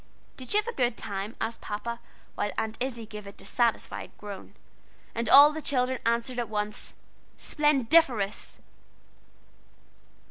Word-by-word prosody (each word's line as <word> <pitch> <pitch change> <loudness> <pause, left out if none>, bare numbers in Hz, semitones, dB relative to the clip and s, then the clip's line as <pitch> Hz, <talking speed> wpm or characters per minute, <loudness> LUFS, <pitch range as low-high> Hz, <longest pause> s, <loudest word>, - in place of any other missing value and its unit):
"Did 255 -2 -9
you - - +4
have 425 - -19
a 475 - -2
good 245 - +1
time?" 200 +1 -4
asked 225 +1 -3
Papa, 235 +3 -4 0.3
while 205 - -1
Aunt 220 0 -1
Izzie 245 -3 -3
gave 210 -1 -9
a - - -7
dissatisfied 235 +1 -1
groan. 205 -2 -9 0.6
And 230 0 -2
all 285 +2 +10
the 315 - -4
children 255 -2 +1
answered 235 +2 0
at 235 -3 -2
once: 210 0 -3 0.4
"Splendiferous!" 275 -7 +2
235 Hz, 135 wpm, -28 LUFS, 210-260 Hz, 0.6 s, all